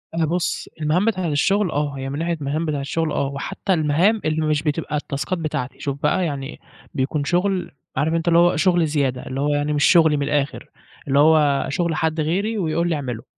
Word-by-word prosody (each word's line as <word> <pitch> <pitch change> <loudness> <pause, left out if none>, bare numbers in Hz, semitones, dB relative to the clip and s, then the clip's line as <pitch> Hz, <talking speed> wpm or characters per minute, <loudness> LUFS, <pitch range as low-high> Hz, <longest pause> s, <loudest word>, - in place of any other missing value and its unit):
أنا 165 - +2
بُص 170 +2 -2
المهام 160 +6 +2
بتاعة 185 -6 0
الشغل، 185 +5 +1
آه 145 -1 -2
هي 135 0 -4
من 140 - -4
ناحية 170 +1 -1
المهام 155 +1 -2
بتاعة 145 -3 -2
الشغل، 160 +3 -2
آه، 140 - 0
وحتى 140 +7 -3
المهام 170 +7 +2
اللي 155 0 0
مش 150 -1 0
بتبقى 150 0 -2
التاسكات 145 +4 -3
بتاعتي، 150 -5 -4
شوف 140 0 -4
بقى 175 +5 +2
يعني 140 -3 -5 0.3
بيكون 145 +1 -1
شغل، 180 +3 0 0.2
عارف 160 +2 0
أنت 165 0 -1
اللي 170 0 +5
هو 175 +1 +4
شغل 175 -3 +3
زيادة، 140 -4 -1
اللي 135 +1 -4
هو 145 - +1
يعني 145 +1 0
مش 145 - +1
شغلي 160 -4 +5
من 140 - -1
الآخر، 145 -1 -2 0.4
اللي 140 0 +3
هو 150 -2 +4
شغل 170 +2 -1
حد 160 0 -1
غيري 195 +9 0
ويقول 170 -2 0
لي 165 - +1
اعمله، 125 -6 -5
155 Hz, 205 wpm, -21 LUFS, 145-170 Hz, 0.4 s, اللي